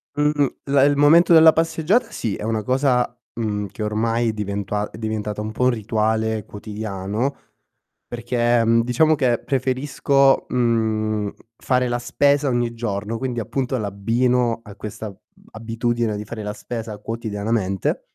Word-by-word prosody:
Mhmm, 145 -1 +2 0.2
la 140 -1 +3
il 145 0 +4
momento 160 +5 +6
della 160 -1 +8
passeggiata 165 +9 +1
sì, 110 -4 -3
è - - -7
una 110 -1 -1
cosa, 125 -1 +1 0.2
mhmm, 105 -3 -2
che 105 - -7
ormai 115 +2 0
è 110 - -1
diventua 105 0 -3
è - - -12
diventata 105 -1 -3
un 110 0 -4
po' 125 +3 0
un - - +5
rituale 110 0 -1
quotidiano, 105 +4 -4 0.7
perché, 120 0 +1
mhmm, 115 +1 +4
diciamo 130 +7 +3
che 125 -5 +1
preferisco, 135 +1 +1
mhmm, 110 -3 0 0.3
fare 125 -1 0
la 120 - -1
spesa 140 +4 +2
ogni 120 -2 0
giorno, 110 -1 -3
quindi 125 -2 -3
appunto 130 +3 -2
l'abbino 115 +4 0
a 105 -3 -12
questa 105 0 -7 0.4
abitudine 115 0 -2
di 105 - -5
fare 110 +1 -7
la 105 0 -4
spesa 110 0 -6
quotidianamente 105 -3 -2
115 Hz, 145 wpm, -21 LUFS, 105-130 Hz, 0.7 s, della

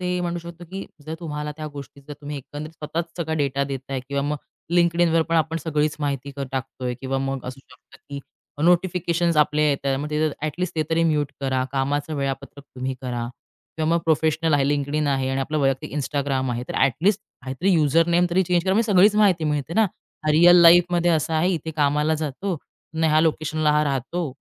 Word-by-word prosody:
ते 180 0 -1
म्हणू 175 -1 -2
शकतो, 170 +1 -10
की 190 +3 -7 0.2
जर 160 - -4
तुम्हाला 150 -2 -4
त्या 155 - -5
गोष्टी 140 0 -10
जर - - -6
तुम्ही 145 0 -6
एकंदरीत 145 +3 -8
स्वतःच 160 +1 -4
सगळा 160 -2 -2
डेटा 140 -2 0
देताय 135 -1 -4
किंवा 140 0 -1
मग 145 +1 -1 0.4
LinkedInवर 170 -1 +3
पण 165 - +2
आपण 160 +1 +1
सगळीच 150 -1 -1
माहिती 140 -2 -2
क - - -6
टाकतोय 130 -1 -4
किंवा 135 0 -2
मग 135 -1 -3
असू 130 +2 -7
शकतं, - - -20
की 140 - -4 0.5
नोटिफिकेशन्स 175 -1 +2
आपले 150 0 +3
येतात 140 -1 0
मग 150 +2 -5
ते 150 0 0
तर - - -6
ॲट 155 -1 -1
लिस्ट 180 0 -2
ते 155 - +2
तरी 165 +1 +2
म्यूट 150 -3 +1
करा. 130 -1 0
कामाचं 145 +3 -1
वेळापत्रक 140 0 -4
तुम्ही 130 +1 -3
करा. 120 -2 -3 0.5
किंवा 155 -1 0
मग - - +3
प्रोफेशनल 160 0 +2
आहे 140 -1 +3
LinkedIn 145 +1 0
आहे 135 -1 0
आणि 135 0 -1
आपलं 150 +3 -1
वैयक्तिक 135 -3 0
Instagram 135 -2 -1
आहे 120 0 -3
तर - - -5
ॲट 135 - +4
लिस्ट 205 0 +3 0.2
काहीतरी 135 +9 -1
युजर 160 0 +3
नेम 175 +1 +4
तरी 185 +2 +3
चेंज 175 -1 +1
करा 190 - +2
म्हणजे 220 0 +2
सगळीच 200 +3 +6
माहिती 190 -6 +3
मिळते 150 +1 -2
ना. 220 - +5 0.4
हा 155 - +2
रिअल 175 +3 +7
लाईफमध्ये 175 0 +5
असं 160 -1 +1
आहे, 160 +3 +2
इथे 160 -2 -3
कामाला 150 +1 +2
जातो, 155 +5 -3 0.4
अन् 160 0 0
ह्या 155 -1 +4
लोकेशनला 155 -1 +1
हा 150 0 +3
राहतो. 140 +3 -2
150 Hz, 205 wpm, -23 LUFS, 140-170 Hz, 0.5 s, रिअल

